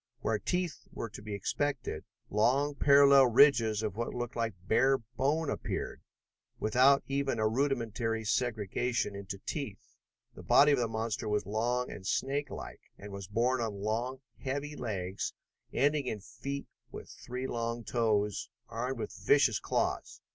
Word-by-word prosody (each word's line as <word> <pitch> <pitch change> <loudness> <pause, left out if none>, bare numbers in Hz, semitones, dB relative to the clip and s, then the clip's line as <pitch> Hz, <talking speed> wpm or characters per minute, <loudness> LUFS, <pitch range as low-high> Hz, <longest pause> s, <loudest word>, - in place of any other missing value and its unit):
Where 110 -2 0
teeth 180 - -2
were 115 - -5
to 105 - -9
be 105 -1 -5
expected, 125 - -2 0.3
long 135 +8 +2
parallel 140 -1 +7
ridges 115 -4 +5
of 105 -3 -2
what 115 +2 -3
looked 120 -1 -4
like 115 -4 -1
bare 135 +4 +4
bone, 135 +8 -1
appeared, - - -3 0.6
without 130 +6 +4
even 135 -2 -1
a 110 -1 +2
rudimentary 115 -3 0
segregation 115 0 0
into 100 0 -6
teeth. 135 -10 -6 0.4
The - - -11
body 145 +1 +6
of 140 - +3
the 120 - +1
monster 110 -1 -2
was 105 -2 0
long 120 +5 -1
and - - -8
snakelike, 140 +8 -2 0.2
and 100 0 -9
was 100 -1 -7
borne 120 +5 +1
on 110 -3 -2
long, 115 +6 -2 0.2
heavy 145 +2 -3
legs 95 -6 -3 0.4
ending 145 -1 +2
in 110 - -2
feet 125 +6 -6 0.3
with - - -8
three 125 +1 -6
long 115 -1 -2
toes, 105 -4 0 0.2
armed 120 +3 -3
with 115 - -5
vicious - - +3
claws. - - -1
120 Hz, 145 wpm, -31 LUFS, 110-135 Hz, 0.6 s, parallel